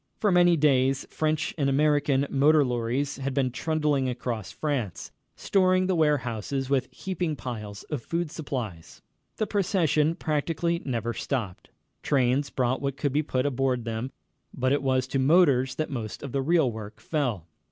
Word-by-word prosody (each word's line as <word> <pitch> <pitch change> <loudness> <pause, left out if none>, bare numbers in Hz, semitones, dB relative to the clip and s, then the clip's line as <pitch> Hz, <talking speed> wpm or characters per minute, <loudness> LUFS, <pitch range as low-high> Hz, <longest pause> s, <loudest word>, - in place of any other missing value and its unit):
For 210 - +2
many 175 -1 +5
days 135 -2 +2
French 155 -1 -1
and 140 -1 +2
American 145 -1 +2
motor 145 +2 +4
lorries 125 +3 -1
had 135 0 -3
been 130 -3 +1
trundling 150 -1 0
across 120 -4 -4
France, 130 - -3 0.2
storing 185 -1 +2
the 190 - +1
warehouses 135 -4 0
with 135 -2 +2
heaping 180 -4 -3
piles 105 -6 -6
of 150 -5 -4
food 170 +2 -3
supplies. 120 - -6 0.3
The 215 - 0
procession 175 -6 +1
practically 165 +2 -1
never 120 -3 -2
stopped. 115 -8 -4 0.3
Trains 135 0 +1
brought 130 0 0
what 140 -1 -2
could 145 -3 -1
be 150 - +3
put 130 -3 -1
aboard 130 -3 0
them, 115 +3 -3 0.4
but 130 0 0
it 145 - +1
was 130 -2 +1
to 135 +1 -2
motors 135 -3 +4
that 155 -1 -3
most 115 -5 -5
of 140 - -5
the 135 - 0
real 160 -3 +3
work 110 -1 -8
fell. 125 - -2
140 Hz, 160 wpm, -26 LUFS, 125-155 Hz, 0.4 s, many